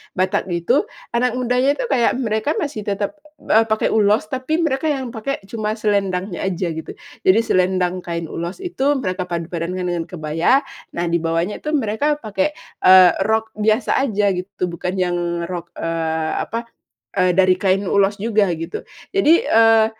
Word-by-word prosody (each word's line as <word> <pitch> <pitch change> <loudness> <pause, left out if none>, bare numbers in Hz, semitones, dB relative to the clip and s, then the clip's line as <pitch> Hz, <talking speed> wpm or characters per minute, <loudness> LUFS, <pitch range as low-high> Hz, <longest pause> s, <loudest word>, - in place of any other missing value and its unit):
Batak 185 0 0
gitu, 170 -2 +1 0.2
anak 245 0 +1
mudanya 250 +3 +1
itu - - -3
kayak 240 -3 +3
mereka 220 +2 0
masih 285 - -3
tetep, 205 +6 -2 0.3
eee, 220 - +5
pakai 220 0 +1
ulos 210 0 +3
tapi 260 +4 -1
mereka 285 -1 0
yang 265 -4 -3
pakai 250 +5 -3
cuma 215 0 -3
selendangnya 195 -3 -1
aja, 185 -1 -1
gitu. 160 - -6 0.3
Jadi 190 +4 +5
selendang 185 0 +1
kain 170 -1 -4
ulos 170 +3 -5
itu 290 -6 0
mereka 185 -5 -2
padu 170 -2 -4
padankan 180 +2 -3
dengan 175 -2 -1
kebaya, 165 - +1 0.3
nah 170 0 -2
di 170 - 0
bawahnya 165 +3 -1
itu 300 - -2
mereka 290 +2 0
pakai, 285 +6 -1 0.3
eee, 185 -1 +8
rok 220 +1 -1
biasa 215 +5 +1
aja 205 -6 +1
gitu, 180 0 -3
bukan 175 +1 -4
yang 180 -1 +1 0.3
rok, 175 -1 -6
eee, 160 -1 -2
apa, 230 +1 -3 0.5
eee, 185 -1 +3
dari 185 +1 +4
kain 190 +1 +1
ulos 200 +2 +2
juga, 210 -2 +1
gitu. 165 +2 -5 0.3
Jadi, 390 -5 +4
eee, 225 0 +5
200 Hz, 160 wpm, -20 LUFS, 180-230 Hz, 0.5 s, eee